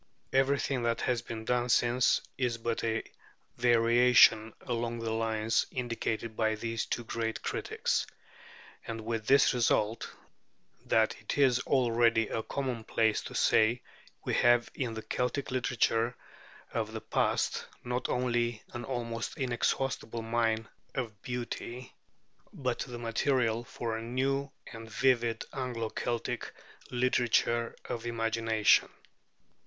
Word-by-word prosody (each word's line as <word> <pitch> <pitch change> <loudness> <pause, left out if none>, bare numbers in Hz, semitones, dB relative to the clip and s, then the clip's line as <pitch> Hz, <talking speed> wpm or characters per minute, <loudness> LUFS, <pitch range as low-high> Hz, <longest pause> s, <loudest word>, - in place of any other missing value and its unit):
Everything 135 -1 +2
that 115 -1 0
has 125 -2 0
been 110 -1 -7
done 125 0 +1
since 120 +1 +3
is 125 -3 -1
but 115 0 -2
a 110 -1 0 0.5
variation 120 -1 +5
along 120 -1 -2
the 115 -1 -3
lines 110 0 +1
indicated 115 -2 -3
by 110 0 +1
these 115 +1 -3
two 120 - -2
great 115 -1 -3
critics; - - -1 0.8
and 115 -1 -4
with 110 -1 -3
this 140 0 +5
result, 115 -2 +1 0.8
that - - +3
it - - -4
is 130 -3 +4
already 115 -4 +2
a 115 - -1
commonplace 115 -4 0
to - - -8
say 115 +3 +3 0.4
we - - -1
have 120 -1 +4
in 120 -4 -3
the 110 - -6
Celtic 125 +2 -2
literature 120 -1 +1 0.6
of - - -2
the - - -5
past - - 0 0.2
not 125 +1 -2
only 120 -2 0
an 120 - -5
almost 115 -2 -4
inexhaustible 120 -3 -1
mine 115 -1 0 0.3
of 110 -6 -4
beauty, 125 0 -5 0.6
but 130 -3 -2
the 125 -2 -5
material 120 0 +1
for 115 -1 -4
a 110 - -4
new 135 +4 -1 0.2
and 115 -1 -9
vivid 120 -1 +1
Anglo 125 -4 -3
Celtic 120 +1 -3 0.4
literature 120 -1 +1
of 115 - -4
the 120 - -4
imagination. 115 -1 +3
120 Hz, 125 wpm, -30 LUFS, 115-125 Hz, 0.8 s, variation